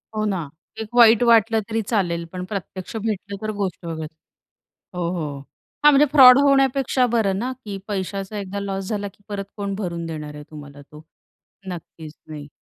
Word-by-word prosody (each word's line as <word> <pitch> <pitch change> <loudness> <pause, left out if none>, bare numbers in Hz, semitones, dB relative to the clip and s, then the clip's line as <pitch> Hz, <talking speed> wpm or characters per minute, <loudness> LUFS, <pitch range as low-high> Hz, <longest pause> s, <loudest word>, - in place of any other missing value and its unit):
हो, 215 - 0
ना. 185 -8 -2 0.3
एक 220 -1 -5
वाईट 235 -1 +7
वाटलं 225 -1 +4
तरी 225 0 0
चालेल, 180 -6 -1
पण 180 0 -4
प्रत्यक्ष 190 0 -6
भेटलं 200 -2 -3
तर 215 0 -2
गोष्ट 185 -3 -3
वेगळी. 160 -2 -4 0.9
हो, 170 -1 -1
हो. 150 -6 -4 0.4
हां, 295 - +8
म्हणजे 285 +1 +5
फ्रॉड 260 -3 +9
होण्यापेक्षा 270 -2 +3
बरं 195 -4 +1
ना, 250 +4 -2
की 200 -1 -5
पैशाचा 195 +1 -4
एकदा 200 0 -5
लॉस 195 -1 -4
झाला, 205 -2 -2
की 200 +1 -16
परत 200 -1 -4
कोण 200 -1 -3
भरून 170 -4 -4
देणार 155 -2 -6
आहे 150 - -9
तुम्हाला 145 -1 -11
तो. 150 +2 -15 0.6
नक्कीच 160 -3 -8
नाही. 150 -2 -8
195 Hz, 170 wpm, -22 LUFS, 170-220 Hz, 0.9 s, फ्रॉड